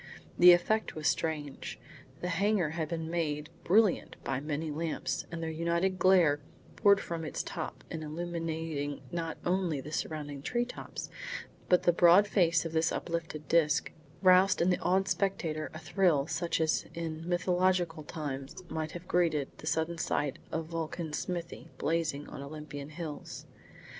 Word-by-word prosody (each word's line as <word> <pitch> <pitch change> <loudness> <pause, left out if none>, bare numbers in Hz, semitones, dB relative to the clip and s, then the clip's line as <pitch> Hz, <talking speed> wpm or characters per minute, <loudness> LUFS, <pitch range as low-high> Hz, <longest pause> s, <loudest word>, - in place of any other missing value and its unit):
The 180 +1 +10
effect 215 +5 +2
was 155 -2 -1
strange. 145 - -2 0.4
The 180 - -2
hangar 195 -1 +2
had 160 -1 -3
been 165 -1 -3
made 155 -2 -1
brilliant 205 +1 +3
by 130 - -1
many 150 +2 -3
lamps, 160 +1 -2
and 165 -1 -4
their 160 - -2
united 170 +3 0
glare 175 -6 +5 0.4
pouring 200 -2 +6
from 170 -4 -4
its 155 - -3
top - - -5
and 160 -1 -4
illuminating 160 -2 -3
not 165 -2 -3
only 175 -4 +1
the 145 +3 -8
surrounding 145 -3 -3
treetops 240 - -3 0.6
but 180 - +5
the 175 - +4
broad 175 +4 +7
face 170 -5 +3
of 165 - -3
this 160 0 +2
uplifted 165 -3 -4
disc, 155 -2 +3 0.3
roused 185 +1 +6
in 175 +2 +3
the 180 - +1
awed 190 +2 +2
spectator 165 -6 -1
a - - -8
thrill 160 -2 +2
such 170 +2 -1
as 160 -1 +1
in 165 0 -4
mythological 180 -2 +1
times 145 -1 -6
might 155 -1 -3
have 175 +1 -8
greeted 160 -6 +1
the 155 - -8
sudden 160 +2 0
sight 145 -2 -1
of 160 0 -2
Vulcan's 165 -1 -3
smithy 175 -2 -5
blazing 155 -2 -1
on - - -8
Olympian 145 0 -7
hills. 155 -1 -7
165 Hz, 155 wpm, -31 LUFS, 155-175 Hz, 0.6 s, The